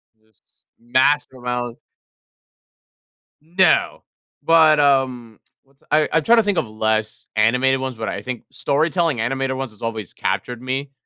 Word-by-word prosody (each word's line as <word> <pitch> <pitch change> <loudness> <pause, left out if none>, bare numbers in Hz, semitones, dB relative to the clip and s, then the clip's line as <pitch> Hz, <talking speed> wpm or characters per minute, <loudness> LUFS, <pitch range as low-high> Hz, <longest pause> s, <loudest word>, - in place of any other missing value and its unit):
This, 110 -1 -31
massive 130 +3 +1
amount. 120 -1 -3 1.6
No. 175 +5 +1 0.4
But, 160 -2 +5
um, 130 -5 +1 0.2
what's 135 0 -33
a - - -27
I 155 0 +3
I'm 160 - +2
trying 235 +1 +4
to 225 - +5
think 205 -3 0
of 120 - 0
less 110 0 -2
animated 125 +5 +2
ones, 130 -1 -4
but 110 -1 -5
I 100 - -4
think 120 +2 -6
storytelling 160 -1 0
animated 130 +3 -1
ones 130 -2 -5
has 105 - -20
always 110 -4 -5
captured 125 -1 -3
me. 135 +2 -4
130 Hz, 145 wpm, -20 LUFS, 115-145 Hz, 1.6 s, But